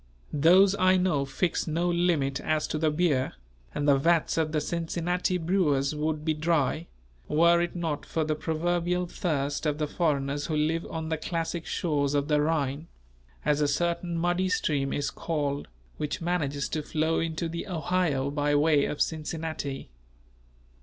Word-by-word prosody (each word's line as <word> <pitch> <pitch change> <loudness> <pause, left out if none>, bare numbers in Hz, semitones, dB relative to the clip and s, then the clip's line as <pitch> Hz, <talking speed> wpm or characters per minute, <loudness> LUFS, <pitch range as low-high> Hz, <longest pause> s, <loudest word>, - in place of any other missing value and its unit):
Those 185 +6 +5
I 185 0 +5
know 180 -7 +1
fix 165 +7 -1
no 165 +3 0
limit 170 -6 +1
as 155 -1 0
to 155 - -2
the 160 0 +2
beer; 150 -4 +1 0.4
and 145 - -1
the 140 -1 +5
vats 165 +2 +2
of 160 -1 0
the 155 - +1
Cincinnati 170 +3 -1
brewers 160 -6 +1
would 150 0 -2
be 160 - +2
dry, 155 0 0 0.4
were 170 +3 +4
it 175 0 -2
not 160 -4 -3
for 160 - -1
the 155 0 0
proverbial 175 +3 -1
thirst 145 -4 -2
of 150 -1 0
the 155 - 0
foreigners 145 -3 -1
who 160 - -1
live 160 +2 0
on 160 -1 -4
the 160 - 0
classic 165 0 -3
shores 145 -4 0
of 145 +1 0
the 150 -1 +3
"Rhine," 150 -1 -1 0.6
as 150 0 +2
a 145 - +3
certain 170 +3 -1
muddy 175 +2 +1
stream 140 -6 0
is 145 - -1
called 145 -4 -2 0.3
which 150 +2 -3
manages 155 -5 -1
to 155 - -2
flow 155 +2 0
into 165 0 -2
the 170 +4 -5
Ohio 160 -5 0
by 145 0 +1
way 145 -1 +4
of 150 - -3
Cincinnati. 155 - -4
160 Hz, 165 wpm, -27 LUFS, 145-170 Hz, 0.6 s, Those